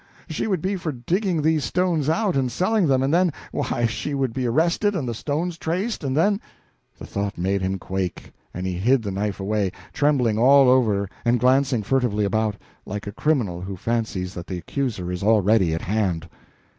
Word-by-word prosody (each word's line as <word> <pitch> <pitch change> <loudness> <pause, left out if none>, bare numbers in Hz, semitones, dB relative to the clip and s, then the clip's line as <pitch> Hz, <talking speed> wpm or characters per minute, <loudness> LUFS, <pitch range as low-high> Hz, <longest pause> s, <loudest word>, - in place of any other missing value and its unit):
She 160 - -2
would 190 -7 -1
be 195 +1 0
for 165 -3 -3
digging 165 - -1
these 155 -1 +2
stones 170 -5 0
out 185 +3 +1
and 130 -2 +1
selling 185 - +1
them, 135 -1 +3
and 135 +3 +1
then 180 0 +4 0.2
why, 120 - -1
she 130 +6 -2
would 135 -4 -1
be 130 -2 -1
arrested 170 - +2
and 145 -8 -2
the 120 - -2
stones 160 +8 -3
traced, 185 +6 -2
and 135 0 -1
then 200 +5 +2 0.3
" - - -43
The - - -9
thought 100 0 -3
made 95 +3 0
him 95 +1 -1
quake, 95 -1 -4 0.2
and 90 +1 -5
he 95 - -1
hid 125 +4 +3
the 100 - -3
knife 100 +1 -2
away, 100 -1 0 0.2
trembling 125 -7 +2
all 135 +2 +6
over 110 -6 +3 0.2
and 120 +1 +2
glancing 130 -1 +3
furtively 110 -2 +1
about, 110 +1 0 0.3
like 105 +2 -6
a 100 - -4
criminal 110 - 0
who 95 +1 -5
fancies 105 -4 -2
that 85 0 -7
the 90 - -4
accuser 95 - -3
is 90 - -4
already 105 -3 +3
at 80 - -2
hand. 95 -5 -1
120 Hz, 195 wpm, -23 LUFS, 100-155 Hz, 0.3 s, all